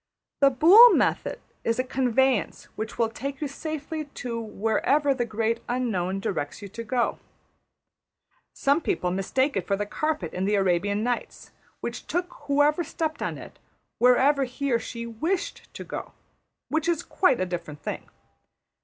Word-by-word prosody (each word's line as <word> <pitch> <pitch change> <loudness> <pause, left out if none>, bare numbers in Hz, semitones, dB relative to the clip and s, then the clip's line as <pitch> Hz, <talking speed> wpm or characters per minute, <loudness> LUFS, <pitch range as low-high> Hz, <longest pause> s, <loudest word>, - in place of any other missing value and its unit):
The 275 - +6
Boole 370 - +8
method - - 0 0.2
is 230 - 0
a 255 - +1
conveyance 260 -2 +1
which 220 +1 -5
will 230 -1 +2
take 275 +3 -5
you 300 - -2
safely 310 +2 -5
to 240 -4 -5
wherever 225 +7 +1
the 245 -2 -1
Great 225 +1 -1
Unknown 195 -7 -1
directs 145 -7 -3
you - - -6
to 230 +4 -7
go. 235 +1 0 1.3
Some 280 +4 +1
people 180 - -1
mistake 260 +9 0
it 195 - -2
for 200 - +2
the 205 +1 -2
carpet 300 - -2
in 185 +1 -1
the 205 +1 +2
\emph{Arabian 195 +2 +1
Nights}, 245 0 -3 0.3
which - - -5
took 355 +1 -2
whoever 290 +4 +3
stepped 315 0 -3
on - - -2
it - - -12 0.4
wherever 265 +3 +4
he 265 +2 -3
or 235 - +3
she 235 0 -6
\emph{wished} 315 - -3
to - - -7
go - - -7 0.5
which 315 +2 0
is 335 -3 +1
a - - -22
quite 255 - +2
different 170 -4 -6
thing. - - -5
245 Hz, 160 wpm, -26 LUFS, 210-290 Hz, 1.3 s, Boole